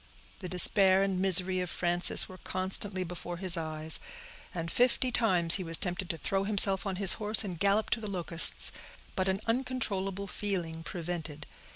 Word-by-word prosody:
The 185 Hz, -, -10 dB
despair 190 Hz, +1 st, +5 dB
and 195 Hz, -2 st, -4 dB
misery 185 Hz, 0 st, +1 dB
of 180 Hz, -1 st, -6 dB
Frances 175 Hz, 0 st, +5 dB
were 185 Hz, -1 st, -15 dB
constantly 190 Hz, +1 st, -2 dB
before 175 Hz, 0 st, -10 dB
his 185 Hz, 0 st, +3 dB
eyes, 155 Hz, -1 st, -2 dB, 0.5 s
and 165 Hz, -1 st, -8 dB
fifty 250 Hz, +1 st, -1 dB
times 180 Hz, -8 st, +1 dB
he 190 Hz, -, -8 dB
was 165 Hz, -1 st, -1 dB
tempted 180 Hz, -1 st, -7 dB
to 165 Hz, -, -4 dB
throw 195 Hz, +5 st, -5 dB
himself 195 Hz, -1 st, +4 dB
on 195 Hz, -, -6 dB
his 195 Hz, -1 st, +5 dB
horse 210 Hz, +1 st, +1 dB
and 180 Hz, -5 st, -9 dB
gallop 200 Hz, +2 st, -2 dB
to 225 Hz, -, -3 dB
the 210 Hz, -, -9 dB
Locusts; 170 Hz, -3 st, +2 dB, 0.4 s
but 185 Hz, -1 st, -4 dB
an 190 Hz, +1 st, -4 dB
uncontrollable 225 Hz, -6 st, -5 dB
feeling 180 Hz, -6 st, -6 dB
prevented. 165 Hz, -4 st, -8 dB
185 Hz, 170 wpm, -27 LUFS, 175-200 Hz, 0.5 s, despair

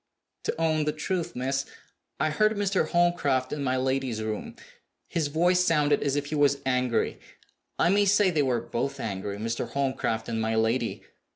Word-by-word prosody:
"To -, -, -2 dB
own 155 Hz, -2 st, +1 dB
the 150 Hz, -, 0 dB
truth, 170 Hz, +2 st, -3 dB
miss, 135 Hz, +2 st, -1 dB, 0.5 s
I 155 Hz, -, +1 dB
heard 215 Hz, +7 st, +3 dB
Mr. 195 Hz, -5 st, +1 dB
Holmcroft 160 Hz, -7 st, +1 dB
in 145 Hz, -1 st, -3 dB
my 130 Hz, -1 st, +1 dB
lady's 130 Hz, -3 st, -1 dB
room. 110 Hz, -1 st, -4 dB, 0.5 s
His 160 Hz, -3 st, -1 dB
voice 175 Hz, +5 st, +3 dB
sounded 150 Hz, -4 st, +2 dB
as 140 Hz, -1 st, 0 dB
if 145 Hz, 0 st, -1 dB
he 145 Hz, -, -6 dB
was 145 Hz, -2 st, +3 dB
angry. 125 Hz, -2 st, 0 dB, 0.6 s
I -, -, +3 dB
may 205 Hz, +2 st, +4 dB
say 200 Hz, -1 st, +4 dB
they 155 Hz, -3 st, +2 dB
were 125 Hz, -4 st, +1 dB
both 140 Hz, +4 st, -3 dB
angry 100 Hz, -2 st, -4 dB
Mr. 115 Hz, +2 st, -3 dB
Holmcroft 130 Hz, -5 st, -1 dB
and 115 Hz, -1 st, -2 dB
my 110 Hz, 0 st, 0 dB
lady." 115 Hz, +2 st, 0 dB
140 Hz, 175 wpm, -27 LUFS, 125-165 Hz, 0.6 s, may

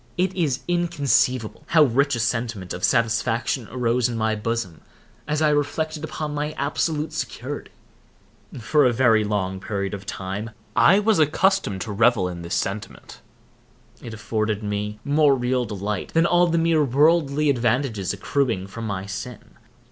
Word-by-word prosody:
It 185 Hz, +1 st, +1 dB
is 155 Hz, -8 st, -1 dB
inconceivable 145 Hz, -9 st, +1 dB
how 160 Hz, -2 st, +5 dB
rich 140 Hz, +1 st, +2 dB
a -, -, -3 dB
sentiment 115 Hz, -5 st, -2 dB
of 90 Hz, -, -7 dB
satisfaction 115 Hz, +1 st, +1 dB
arose 125 Hz, 0 st, 0 dB
in 120 Hz, -, -4 dB
my 110 Hz, 0 st, +1 dB
bosom 110 Hz, -5 st, -3 dB, 0.5 s
as 150 Hz, +1 st, 0 dB
I 150 Hz, -, +4 dB
reflected 150 Hz, +2 st, -1 dB
upon 155 Hz, -1 st, -4 dB
my 150 Hz, +1 st, -2 dB
absolute 150 Hz, +2 st, -2 dB
security. 145 Hz, -3 st, -5 dB, 0.9 s
For 145 Hz, +6 st, +2 dB
a 125 Hz, -, +4 dB
very 115 Hz, -3 st, +4 dB
long 95 Hz, -3 st, -2 dB
period 100 Hz, 0 st, -3 dB
of 100 Hz, 0 st, -7 dB
time 95 Hz, +4 st, -5 dB, 0.3 s
I 190 Hz, -, +6 dB
was 210 Hz, -2 st, +2 dB
accustomed 155 Hz, -, +2 dB
to 110 Hz, -, -4 dB
revel 110 Hz, -2 st, +3 dB
in 90 Hz, -1 st, -6 dB
this 85 Hz, +1 st, -3 dB
sentiment. 100 Hz, +2 st, -5 dB, 0.8 s
It 115 Hz, -, -8 dB
afforded 110 Hz, 0 st, -2 dB
me 105 Hz, 0 st, -3 dB
more 145 Hz, -1 st, +4 dB
real 125 Hz, 0 st, 0 dB
delight 105 Hz, -2 st, -4 dB
than 165 Hz, +1 st, +4 dB
all 175 Hz, 0 st, +4 dB
the 170 Hz, 0 st, +1 dB
mere 165 Hz, -2 st, +3 dB
worldly 145 Hz, +1 st, +3 dB
advantages 120 Hz, -5 st, 0 dB
accruing 110 Hz, -1 st, -1 dB
from 110 Hz, +3 st, -7 dB
my 95 Hz, -2 st, -4 dB
sin. 100 Hz, +5 st, -7 dB
125 Hz, 155 wpm, -23 LUFS, 105-150 Hz, 0.9 s, I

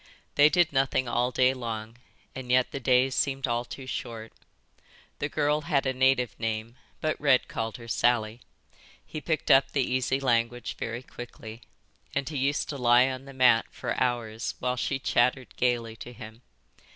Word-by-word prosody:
They 145 Hz, +1 st, +6 dB
did 175 Hz, -2 st, +2 dB
nothing 135 Hz, -1 st, +1 dB
all 120 Hz, +1 st, +1 dB
day 130 Hz, +1 st, +3 dB
long 115 Hz, -2 st, -6 dB, 0.4 s
and 130 Hz, -2 st, -8 dB
yet 125 Hz, 0 st, +3 dB
the 140 Hz, -, -4 dB
days 130 Hz, 0 st, +3 dB
seemed 135 Hz, +1 st, 0 dB
all 120 Hz, -1 st, -1 dB
too 130 Hz, +2 st, -9 dB
short. 115 Hz, -3 st, -6 dB, 0.9 s
The -, -, -2 dB
girl 150 Hz, +1 st, +1 dB
had 150 Hz, -4 st, 0 dB
a 130 Hz, -, 0 dB
native 130 Hz, -3 st, +2 dB
name, 115 Hz, +1 st, -3 dB, 0.3 s
but 155 Hz, -1 st, -1 dB
Red 140 Hz, -3 st, +4 dB
called 115 Hz, 0 st, -4 dB
her 115 Hz, -1 st, -11 dB
Sally. 115 Hz, -1 st, +1 dB, 0.6 s
He 155 Hz, -, -7 dB
picked 155 Hz, -2 st, 0 dB
up 135 Hz, 0 st, +6 dB
the 140 Hz, -, +1 dB
easy 130 Hz, +1 st, 0 dB
language 120 Hz, -2 st, 0 dB
very 120 Hz, +2 st, -4 dB
quickly, 115 Hz, -2 st, -10 dB, 0.5 s
and 140 Hz, -1 st, -1 dB
he 150 Hz, -, -4 dB
used 140 Hz, +2 st, 0 dB
to 140 Hz, -, -4 dB
lie 125 Hz, +1 st, +5 dB
on 130 Hz, +1 st, -7 dB
the 135 Hz, -, -10 dB
mat 125 Hz, -3 st, +4 dB
for -, -, -4 dB
hours 115 Hz, -3 st, -1 dB
while 125 Hz, 0 st, -1 dB
she 135 Hz, +2 st, -1 dB
chattered 125 Hz, 0 st, +1 dB
gaily 120 Hz, -2 st, 0 dB
to 120 Hz, -, -9 dB
him. 110 Hz, 0 st, -11 dB
125 Hz, 175 wpm, -27 LUFS, 120-135 Hz, 0.9 s, They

